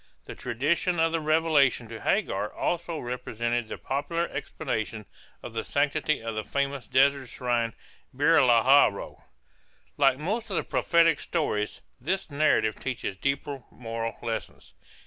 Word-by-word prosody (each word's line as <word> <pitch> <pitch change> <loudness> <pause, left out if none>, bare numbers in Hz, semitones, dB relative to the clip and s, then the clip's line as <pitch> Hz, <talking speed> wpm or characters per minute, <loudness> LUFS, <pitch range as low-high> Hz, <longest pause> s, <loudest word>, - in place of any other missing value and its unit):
The - - -7
tradition 160 +8 0
of 165 0 +3
the 165 - 0
revelation 155 -6 +3
to 115 -1 -8
Hagar - - 0
also 170 -1 -2
represented 120 -2 -2
the - - -6
popular 165 +5 -2
explanation 110 -6 -4 0.4
of - - -7
the - - -2
sanctity 150 -1 0
of 115 0 -3
the 110 0 -3
famous 140 0 -2
desert 135 -1 +3
shrine 120 -2 -1 0.4
Beer 145 +4 +4
lahal 125 +2 +6
roi. 100 - -8 0.8
Like 135 -2 +4
most 215 - -3
of 195 - -3
the - - 0
prophetic 165 -2 +3
stories, 105 -11 -2 0.2
this 175 +5 -2
narrative 140 -7 +2
teaches 125 -6 -3
deeper 140 +5 -2
moral 115 -1 -5
lessons. 115 -2 -5
140 Hz, 140 wpm, -27 LUFS, 115-155 Hz, 0.8 s, lahal